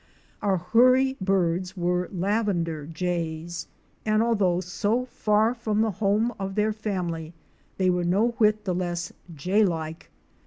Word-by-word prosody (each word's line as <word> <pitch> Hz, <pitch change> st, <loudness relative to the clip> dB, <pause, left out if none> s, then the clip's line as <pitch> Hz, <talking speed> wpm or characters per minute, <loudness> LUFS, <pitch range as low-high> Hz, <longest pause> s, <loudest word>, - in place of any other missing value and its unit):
Our 195 Hz, -2 st, +2 dB
Hoorie 255 Hz, +8 st, +4 dB
birds 185 Hz, -1 st, 0 dB
were 180 Hz, 0 st, 0 dB
Lavender 180 Hz, -6 st, -1 dB
Jays 170 Hz, 0 st, -3 dB, 0.2 s
" -, -, -38 dB
and 215 Hz, 0 st, +2 dB
although 200 Hz, -7 st, +2 dB
so 205 Hz, +7 st, -1 dB
far 215 Hz, -1 st, +1 dB
from 220 Hz, -3 st, -1 dB
the 220 Hz, -1 st, +2 dB
home 215 Hz, +4 st, +2 dB
of 195 Hz, 0 st, -4 dB
their 215 Hz, 0 st, +1 dB
family 175 Hz, -6 st, -4 dB, 0.4 s
they 185 Hz, -1 st, +3 dB
were 180 Hz, 0 st, 0 dB
no 195 Hz, +7 st, +2 dB
whit 215 Hz, -3 st, +2 dB
the 185 Hz, -, 0 dB
less 175 Hz, -1 st, -3 dB, 0.2 s
Jay 185 Hz, +9 st, +2 dB
like. 160 Hz, -3 st, -3 dB
190 Hz, 145 wpm, -26 LUFS, 175-215 Hz, 0.4 s, Hoorie